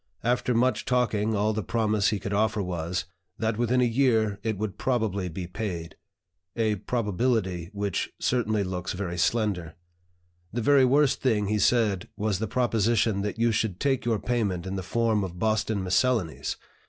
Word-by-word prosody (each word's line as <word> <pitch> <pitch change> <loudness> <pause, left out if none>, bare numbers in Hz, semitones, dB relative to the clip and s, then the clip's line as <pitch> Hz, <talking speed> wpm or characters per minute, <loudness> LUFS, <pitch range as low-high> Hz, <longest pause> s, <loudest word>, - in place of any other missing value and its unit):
After 125 0 +1
much 125 +2 +2
talking 110 -4 +1
all 105 +2 +1
the 110 - -1
promise 110 -1 +1
he 105 - +1
could 100 +1 -4
offer 110 +1 +1
was, 90 -1 -3 0.3
'that 110 0 -1
within 120 +1 +2
a - - +4
year 115 -4 +2
it 110 -1 -2
would 105 0 -4
probably 110 -7 0
be 90 +2 -5
paid,' 90 -3 -5 0.6
a 110 -2 +1
probability 105 -5 -1
which 100 -3 -2
certainly 110 -4 +1
looks 90 -1 -3
very 90 -2 -4
slender. 100 -7 0 0.8
The 120 - -2
very 135 +2 +5
worst 140 +2 +3
thing 105 -6 +1
he 105 0 +1
said 105 -4 +2
was 105 -2 0
the 110 - -2
proposition 115 -3 +1
that 105 +1 -3
you 115 0 +2
should 110 -4 -1
take 135 -2 +1
your 115 -2 +1
payment 100 -6 -1
in 95 +1 -4
the 95 - -2
form 110 +2 +1
of 90 -2 -6
Boston 110 0 0
Miscellanies! 95 - 0
110 Hz, 165 wpm, -27 LUFS, 95-115 Hz, 0.8 s, very